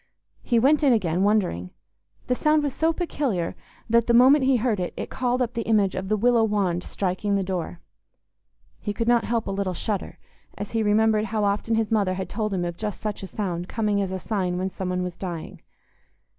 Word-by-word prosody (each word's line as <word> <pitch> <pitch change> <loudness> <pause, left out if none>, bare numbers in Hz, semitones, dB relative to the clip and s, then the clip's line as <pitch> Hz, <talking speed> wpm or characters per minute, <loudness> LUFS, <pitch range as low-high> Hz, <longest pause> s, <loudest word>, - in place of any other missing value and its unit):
He 240 - +1
went 280 +6 +4
in 270 -3 +5
again, 180 -5 +1
wondering; 190 - +1 0.6
the 250 - +1
sound 305 +3 +2
was 285 -3 -1
so 320 +1 +2
peculiar 280 - -2 0.3
that 235 0 +3
the 235 - +4
moment 265 +3 +6
he 265 0 +4
heard 225 -3 0
it 180 - -3
it - - -5
called 250 0 0
up 240 0 -4
the 230 - -2
image 205 -4 +3
of 190 +1 -4
the 215 - +2
willow 235 +1 +3
wand 195 -5 0
striking 200 +1 -1
the 195 - +1
door. 180 -2 -4 1.0
He 205 - -3
could 230 +2 -2
not 240 -1 +3
help 230 -1 -1
a - - -3
little 195 -2 -2
shudder, 200 +2 -3 0.4
as 205 0 -5
he 225 - 0
remembered 215 0 +3
how 215 0 -1
often 205 +3 0
his 220 -1 0
mother 200 -4 +2
had 185 -1 -4
told 215 +1 -2
him 180 -2 -1
of 175 0 -4
just 210 -2 -4
such 210 -2 -4
a 190 - -6
sound 180 -2 -4
coming 210 -3 0
as 190 -1 -2
a 190 - -2
sign 185 -3 -2
when 190 +1 -2
some 185 -1 -4
one 180 0 -1
was 180 -1 -5
dying. 175 -4 -6
210 Hz, 215 wpm, -24 LUFS, 185-230 Hz, 1.0 s, moment